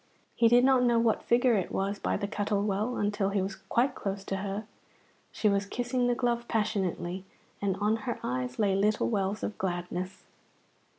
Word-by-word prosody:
He 230 - +4
did 240 +2 +6
not 260 -1 +5
know 240 -1 +3
what 230 -2 +2
figure 245 +1 +3
it 195 -5 0
was 195 +1 -1
by - - 0
the 200 - -2
Cuttle 205 -1 -1
Well 210 +4 -1
until 205 -1 0
he 200 0 0
was 190 0 -3
quite 255 +3 0
close 195 -3 -4
to 195 - -3
her. 200 +2 -4 0.7
She 215 - 0
was 200 0 +2
kissing 245 +2 0
the 245 - +2
glove 240 -1 0
passionately, 190 -4 -1 0.4
and 195 -2 +1
on 210 +2 +2
her 230 +2 -4
eyes 125 0 -2
lay 200 -3 +2
little 210 +2 +2
wells 200 -1 -1
of 210 - -4
gladness. 180 +1 -3
205 Hz, 185 wpm, -29 LUFS, 195-235 Hz, 0.7 s, did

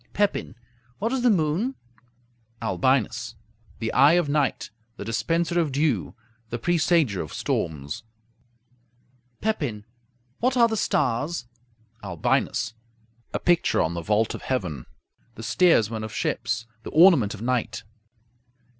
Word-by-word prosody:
Pepin 205 - 0 0.4
What 225 +5 -1
is 265 - 0
the 245 - +4
moon? 190 - +1 0.8
Albinus 115 +3 0 0.4
The 115 -1 -3
eye 145 +3 +6
of 175 -3 +3
night; 145 -1 0 0.3
the - - -6
dispenser 165 +9 0
of 160 -4 0
dew; 130 - 0 0.3
the 120 - -3
presager 160 - +2
of 75 - -7
storms. 75 -3 -3 1.4
Pepin 145 - -2 0.5
What 255 +2 +1
are 235 -1 +6
the 225 - -2
stars? 160 - 0 0.6
Albinus 90 +4 0 0.6
A - - -1
picture 175 -1 +2
on 80 - +1
the 85 - -3
vault 105 +5 +1
of - - -7
heaven; 90 - -3 0.5
the 115 - -9
steersmen 115 - +3
of 110 - -5
ships; 115 0 -2 0.2
the - - -7
ornament 155 - +5
of 110 - -9
night. 125 -1 -1
130 Hz, 125 wpm, -25 LUFS, 110-170 Hz, 1.4 s, eye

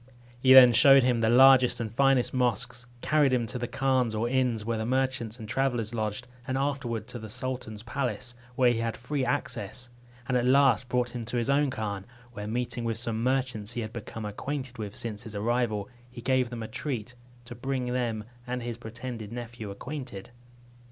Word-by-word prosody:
He 130 +1 +4
then 125 -2 +10
showed 135 +3 +7
him 125 -2 +2
the 110 - +3
largest 130 +1 +6
and 110 -2 -4
finest 135 0 +3
mosques, 125 0 -1
carried 150 -3 +3
him 125 -2 +1
to 120 +3 -4
the 120 - -2
khans 130 -2 +1
or 110 +2 0
inns 125 -4 0
where 115 -1 -1
the - - -1
merchants 130 -3 -1
and 110 -3 -8
travellers 120 -2 0
lodged, 110 +2 -3 0.2
and 130 0 -1
afterward 135 -5 -2
to 120 - -6
the 110 -1 -8
sultan's 110 -3 -5
palace, 120 -1 -2 0.2
where 125 -1 +4
he 115 - -1
had 115 -1 -2
free 135 +3 -2
access; 120 0 -3 0.4
and 125 - 0
at 125 -1 +2
last 130 -2 +4
brought 125 -1 +1
him 120 -1 -5
to 120 +2 -3
his 120 +3 +1
own 145 0 +3
khan, 105 -5 -4 0.3
where, 105 -1 -6
meeting 120 +1 -2
with 115 -1 -1
some 115 -1 -2
merchants 125 -4 -1
he 120 - -3
had 110 0 -6
become 115 -1 -6
acquainted 130 +3 -5
with 105 -2 -5
since 105 -3 -4
his 110 -3 -9
arrival, 110 -1 0 0.2
he 125 0 -11
gave 130 0 +1
them 120 -2 -5
a - - -5
treat, 125 -1 -4 0.3
to 120 - -8
bring 125 0 -2
them 115 -4 -1 0.2
and 125 0 -3
his 120 -1 -4
pretended 115 -1 -7
nephew 120 -2 -6
acquainted. 125 -1 -7
120 Hz, 195 wpm, -28 LUFS, 110-130 Hz, 0.4 s, then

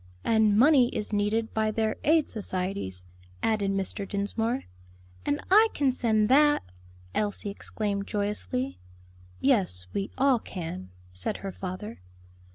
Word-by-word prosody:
"And 220 -2 +3
money 265 0 +6
is 210 0 -4
needed 210 +2 0
by 220 0 +1
their 220 0 0
aid 315 0 +4
societies," 185 - -3 0.4
added 210 -3 +1
Mr. 195 0 -2
Dinsmore. 225 +5 -1 0.6
"And 145 - +1
I 430 +3 +8
can 280 -2 +2
send 220 -4 +2
that!" 295 +4 +5 0.5
Elsie 205 - 0
exclaimed 200 -1 -3
joyously 90 - -2 0.6
"Yes, 190 - +2
we 195 0 -2
all 265 -2 +4
can," 160 - -6 0.2
said 90 0 -2
her 195 - -3
father. 190 +4 -7
210 Hz, 125 wpm, -27 LUFS, 195-230 Hz, 0.6 s, I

